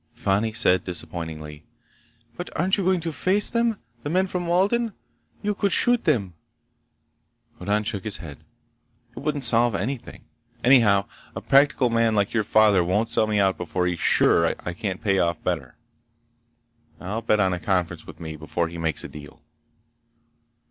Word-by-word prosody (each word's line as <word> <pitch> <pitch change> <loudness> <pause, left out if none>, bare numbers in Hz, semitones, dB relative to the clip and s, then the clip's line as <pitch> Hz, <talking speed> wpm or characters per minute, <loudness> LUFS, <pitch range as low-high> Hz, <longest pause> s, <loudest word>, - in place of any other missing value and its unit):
Fani 105 +3 0
said 95 -4 +2
disappointedly: 80 -3 -5 0.7
"But 175 - -6
aren't 185 +4 +3
you 200 - -1
going 185 -1 +2
to 165 0 -3
face 185 +9 +1
them? 235 -2 +1 0.2
The 145 - -5
men 185 +4 +2
from 180 -2 -4
Walden? 205 +6 +1 0.5
You 210 0 0
could 200 0 0
shoot 245 -1 +3
them!" 105 - +1 1.3
Hoddan 105 +3 0
shook 105 -3 -4
his 110 - -4
head. 75 -6 -10 0.8
"It - - -7
wouldn't 145 0 -2
solve 115 -1 +3
anything. 125 +6 -5 0.4
Anyhow 115 -6 +5 0.3
a - - -5
practical 135 -3 +3
man 115 -1 +2
like 100 -1 +1
your 110 -2 +1
father 105 -3 +4
won't 105 +6 0
sell 110 - +2
me 105 -1 0
out 95 -1 +2
before 90 +1 -2
he's 90 -2 -1
sure 85 0 +3
I 90 - -3
can't 95 0 -5
pay 100 -3 +2
off 85 -2 0
better. 65 -3 -3 1.2
I'll 105 +5 -4
bet 105 -2 +1
on 95 -2 +2
a 90 - -3
conference 90 -3 -2
with - - -11
me 80 -1 -6
before 80 +2 -2
he 85 0 -8
makes 80 -2 -2
a - - -5
deal." 75 -2 -12
105 Hz, 165 wpm, -24 LUFS, 90-145 Hz, 1.3 s, Anyhow